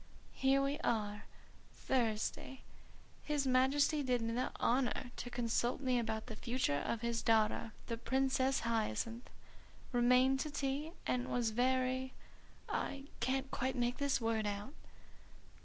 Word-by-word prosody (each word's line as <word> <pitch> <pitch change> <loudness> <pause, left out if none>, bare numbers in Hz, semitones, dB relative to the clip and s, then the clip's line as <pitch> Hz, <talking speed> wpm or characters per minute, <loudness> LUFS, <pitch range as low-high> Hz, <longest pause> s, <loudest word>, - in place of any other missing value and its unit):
"Here 270 +1 +3
we 280 +2 -1
are! 210 -2 -1 0.5
'Thursday. 240 +1 -1 0.6
His 295 -2 0
Majesty 270 +4 +3
did 250 -4 +1
me 230 0 -1
the 250 +2 -1
honour 245 0 +1
to 245 - -5
consult 240 0 0
me 255 -3 +1
about 220 -1 -2
the 225 - -7
future 235 - 0
of 230 - -2
his 235 -1 -1
daughter, 220 0 +2
the 230 - -3
Princess 265 +2 +1
Hyacinth. 230 - -2 0.6
Remained 250 +2 +4
to 305 - -2
tea 285 +2 -2
and 250 0 0
was 235 -2 +1
very 255 +2 +1 0.3
' - - -27
I 275 -1 -2 0.2
can't 265 +2 -1
quite 260 +1 -1
make 245 0 0
this 280 -1 +1
word 225 -2 0
out." 205 +6 -4
250 Hz, 140 wpm, -36 LUFS, 230-265 Hz, 0.6 s, Remained